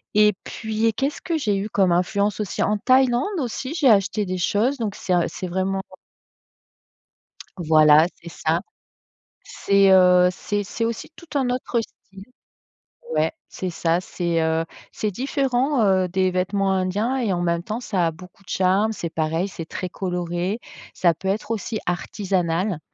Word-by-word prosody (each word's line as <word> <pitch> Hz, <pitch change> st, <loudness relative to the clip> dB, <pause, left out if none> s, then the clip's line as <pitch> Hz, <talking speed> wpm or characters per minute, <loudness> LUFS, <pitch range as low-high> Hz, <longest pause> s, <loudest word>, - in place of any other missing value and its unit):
et 210 Hz, 0 st, +5 dB
puis 220 Hz, 0 st, -3 dB
et 225 Hz, -, +3 dB
qu'est-ce 275 Hz, +6 st, -2 dB
que 335 Hz, -2 st, -1 dB
j'ai 210 Hz, -8 st, 0 dB
eu 205 Hz, +2 st, -3 dB
comme 195 Hz, -3 st, +2 dB
influence 200 Hz, +4 st, +1 dB
aussi? 210 Hz, -, -2 dB
En 210 Hz, -, +1 dB
Thaïlande 255 Hz, +2 st, +3 dB, 0.2 s
aussi, 260 Hz, +3 st, -3 dB
j'ai 290 Hz, -6 st, +4 dB
acheté 205 Hz, 0 st, +3 dB
des 185 Hz, 0 st, -3 dB
choses, 220 Hz, +10 st, +1 dB
donc 215 Hz, -4 st, -3 dB
c'est 185 Hz, -, -2 dB
un 175 Hz, -1 st, +3 dB
c'est 185 Hz, -, -6 dB
vraiment 190 Hz, +2 st, -1 dB, 1.8 s
Voilà 155 Hz, -2 st, +6 dB, 0.2 s
c'est 170 Hz, -, -9 dB
ça. 165 Hz, +1 st, -1 dB, 0.8 s
C'est, 200 Hz, -1 st, +3 dB
heu, 180 Hz, -1 st, +6 dB
c'est 205 Hz, +3 st, -3 dB
c'est 230 Hz, +4 st, -3 dB
aussi 230 Hz, +5 st, -4 dB
tout 340 Hz, -, -14 dB
un 265 Hz, -3 st, +1 dB
autre 250 Hz, -1 st, -1 dB
style. 195 Hz, -3 st, -13 dB, 0.9 s
Ouais -, -, +2 dB, 0.2 s
c'est 185 Hz, -, -4 dB
ça, 170 Hz, 0 st, 0 dB
c'est, 170 Hz, -2 st, -2 dB
heu, 160 Hz, 0 st, +1 dB, 0.3 s
c'est 215 Hz, -, -2 dB
différent, 265 Hz, +2 st, 0 dB
heu, 185 Hz, -2 st, +3 dB
des 185 Hz, +1 st, +1 dB
vêtements 195 Hz, +2 st, 0 dB
indiens 195 Hz, +7 st, 0 dB
et 230 Hz, -7 st, 0 dB
en 175 Hz, -, -1 dB
même 170 Hz, -1 st, 0 dB
temps 220 Hz, +5 st, -4 dB
ça 185 Hz, -8 st, 0 dB
a -, -, -1 dB
beaucoup 180 Hz, +4 st, -15 dB
de 180 Hz, -, -18 dB
charme. 195 Hz, +4 st, +2 dB
C'est 170 Hz, -5 st, -4 dB
pareil, 160 Hz, +4 st, -1 dB
c'est 165 Hz, -3 st, -7 dB
très 185 Hz, +2 st, -5 dB
coloré, 180 Hz, +3 st, -3 dB, 0.3 s
ça 175 Hz, -2 st, +3 dB
peut 180 Hz, +4 st, -7 dB
être 210 Hz, +4 st, -1 dB
aussi 220 Hz, 0 st, -3 dB
artisanal. 180 Hz, 0 st, -1 dB
195 Hz, 165 wpm, -23 LUFS, 180-220 Hz, 1.8 s, Voilà